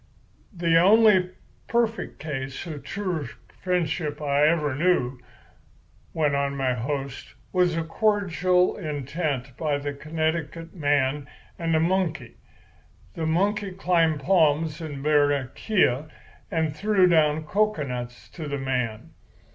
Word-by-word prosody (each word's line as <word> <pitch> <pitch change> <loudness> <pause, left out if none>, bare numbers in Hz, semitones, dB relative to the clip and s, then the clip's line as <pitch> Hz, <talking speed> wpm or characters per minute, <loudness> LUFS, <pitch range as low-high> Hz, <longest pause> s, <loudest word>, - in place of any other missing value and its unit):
"The 165 -1 +3
only 200 -2 +5 0.4
perfect 230 -1 -1
case 135 -1 -5
of 155 -4 -6
true 180 -8 -3 0.3
friendship 160 -4 -1
I 145 0 +2
ever 155 -3 +1
knew," 135 -5 +1 0.9
went 150 -3 +1
on 140 0 -1
my 130 -2 +1
host, 135 +2 -5 0.2
"was 180 -2 +2
a 165 - 0
cordial 185 -1 +1
intent 145 - -3
between 145 -1 -2
a 145 - -2
Connecticut 160 +2 -3
man 145 -3 0 0.3
and 165 -1 0
a - - +4
monkey. 165 -7 -1 0.8
The 160 -1 -3
monkey 195 +4 0
climbed 165 -5 +1
palms 160 -1 +2
in 145 -4 -6
Barranquilla 145 - +1 0.4
and 160 -2 -1
threw 200 +2 +3
down 155 -3 +3
cocoanuts 140 - -2
to 160 -3 -7
the 140 0 -3
man. 125 -5 -3
155 Hz, 115 wpm, -25 LUFS, 140-180 Hz, 0.9 s, only